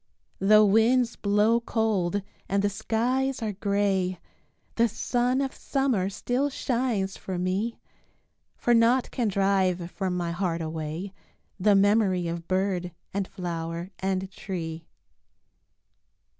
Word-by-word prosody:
Though 215 Hz, +2 st, +6 dB
winds 230 Hz, +4 st, +3 dB
blow 210 Hz, +3 st, +3 dB
cold 205 Hz, -5 st, 0 dB, 0.3 s
and 200 Hz, +1 st, +1 dB
the 205 Hz, -, +2 dB
skies 245 Hz, +5 st, 0 dB
are 215 Hz, -2 st, -2 dB
gray, 195 Hz, -2 st, 0 dB, 0.5 s
The 235 Hz, 0 st, +3 dB
sun 245 Hz, +3 st, 0 dB
of 270 Hz, -1 st, -2 dB
summer 255 Hz, -9 st, 0 dB
still 250 Hz, +7 st, -1 dB
shines 235 Hz, -7 st, -1 dB
for 185 Hz, -2 st, -5 dB
me, 190 Hz, +6 st, -1 dB, 0.8 s
For 240 Hz, -, +2 dB
naught 235 Hz, +2 st, +3 dB
can 240 Hz, -4 st, 0 dB
drive 190 Hz, -3 st, +1 dB
from 185 Hz, -2 st, -2 dB
my 170 Hz, -1 st, -2 dB
heart 170 Hz, -1 st, -1 dB
away, 160 Hz, +4 st, -4 dB, 0.5 s
The 205 Hz, +2 st, +4 dB
memory 195 Hz, -3 st, +3 dB
of 170 Hz, 0 st, -5 dB
bird 185 Hz, -2 st, -1 dB, 0.2 s
and 195 Hz, -1 st, -1 dB
flower 170 Hz, 0 st, -5 dB
and 190 Hz, 0 st, -2 dB
tree. 165 Hz, -4 st, -6 dB
200 Hz, 120 wpm, -27 LUFS, 180-230 Hz, 0.8 s, Though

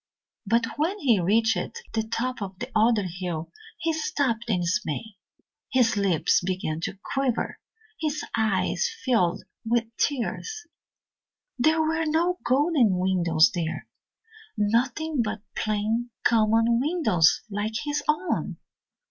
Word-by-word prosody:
But 230 Hz, +2 st, +3 dB
when 335 Hz, +7 st, 0 dB
he 250 Hz, -, +3 dB
reached 225 Hz, -, +1 dB
the 225 Hz, -, +1 dB
top 230 Hz, +2 st, -3 dB
of 190 Hz, -2 st, -5 dB
the 250 Hz, +6 st, -6 dB
other 220 Hz, -1 st, +4 dB
hill 175 Hz, -2 st, -4 dB, 0.3 s
he 330 Hz, -, -1 dB
stopped 265 Hz, -7 st, -1 dB
in 185 Hz, -5 st, +1 dB
dismay; 190 Hz, +3 st, -2 dB, 0.6 s
his 250 Hz, -4 st, +3 dB
lips 195 Hz, -6 st, +2 dB
began 180 Hz, -4 st, -2 dB
to 190 Hz, -, -4 dB, 0.2 s
quiver, 270 Hz, -4 st, -1 dB, 0.4 s
his 305 Hz, -1 st, -2 dB
eyes 220 Hz, -, +1 dB, 0.2 s
filled 200 Hz, -7 st, +2 dB, 0.2 s
with 230 Hz, 0 st, -1 dB
tears. 345 Hz, -, -2 dB, 0.9 s
There 315 Hz, +5 st, +3 dB
were 325 Hz, +1 st, 0 dB
no 345 Hz, +4 st, +1 dB
golden 260 Hz, -, +3 dB
windows 175 Hz, -3 st, +3 dB
there 165 Hz, -2 st, -3 dB, 0.7 s
nothing 245 Hz, +8 st, +1 dB
but 215 Hz, -2 st, -3 dB
plain, 215 Hz, +3 st, -1 dB
common 225 Hz, +1 st, +3 dB
windows 250 Hz, -, +3 dB
like 205 Hz, +2 st, -2 dB
his 295 Hz, 0 st, -1 dB
own. 310 Hz, +4 st, 0 dB
225 Hz, 120 wpm, -26 LUFS, 200-285 Hz, 0.9 s, other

